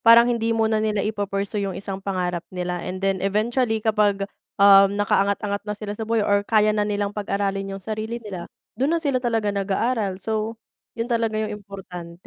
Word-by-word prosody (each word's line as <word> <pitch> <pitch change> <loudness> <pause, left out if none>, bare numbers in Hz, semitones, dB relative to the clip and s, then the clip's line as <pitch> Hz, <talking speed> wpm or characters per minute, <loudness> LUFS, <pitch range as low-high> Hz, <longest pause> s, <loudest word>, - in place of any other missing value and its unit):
parang 230 0 +8
hindi 230 -1 0
muna 220 -1 +2
nila 215 -2 0
ipo-pursue 205 -1 -1
yung 190 - -5
isang 195 -1 -3
pangarap 180 -3 -2
nila 180 -1 -3
and 185 +2 -5
then 195 -1 +1
eventually 220 +4 +1
kapag, 210 -2 +2 0.3
um, 200 0 +7
nakaangat-angat 200 0 +1
na 210 - -1
sila 205 0 -5
sa 220 +1 -6
buhay 225 -2 +2
or 200 0 +3
kaya 215 0 +3
na 210 -1 +1
nilang 205 0 -1
pag-aralin 195 -1 -2
yung 195 - -9
sarili 220 +1 -3
nila 185 -5 -6 0.3
dun 270 +7 0
na 335 - +3
sila 280 -6 0
talaga 225 -4 0
nag-aaral. 200 0 0
So, 220 +2 -2 0.4
'yon 230 - -1
talaga 230 -2 0
yung 215 -1 -2
importante 180 -3 -10
205 Hz, 180 wpm, -23 LUFS, 195-220 Hz, 0.4 s, parang